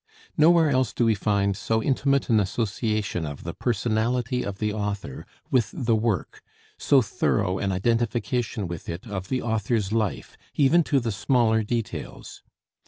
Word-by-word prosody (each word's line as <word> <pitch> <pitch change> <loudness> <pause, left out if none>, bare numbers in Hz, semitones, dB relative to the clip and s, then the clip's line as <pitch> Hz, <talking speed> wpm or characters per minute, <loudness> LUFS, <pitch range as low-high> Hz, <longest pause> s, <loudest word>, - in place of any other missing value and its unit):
Nowhere 160 0 +5
else 130 -6 +1
do 120 - +1
we 115 - +4
find 100 -1 0
so 110 +3 0
intimate 140 0 +1
an 110 -3 +4
association 105 -2 -1
of 75 -2 -6
the - - -5
personality 120 +2 0
of 100 -1 -5
the 105 0 -1
author 100 -9 -4 0.2
with 120 -5 +2
the 120 -4 +1
work, 110 -4 -1 0.4
so 135 -3 +4
thorough 95 -2 0
an 100 - -1
identification 115 +1 -1
with 85 -1 -7
it 85 +6 -6
of 95 -4 -6
the 130 - -1
author's 110 -2 -1
life, 110 -4 -2 0.2
even 155 +4 +4
to 140 - +2
the 115 -2 -2
smaller 110 +2 +2
details. 115 +1 -5
110 Hz, 155 wpm, -25 LUFS, 100-125 Hz, 0.4 s, Nowhere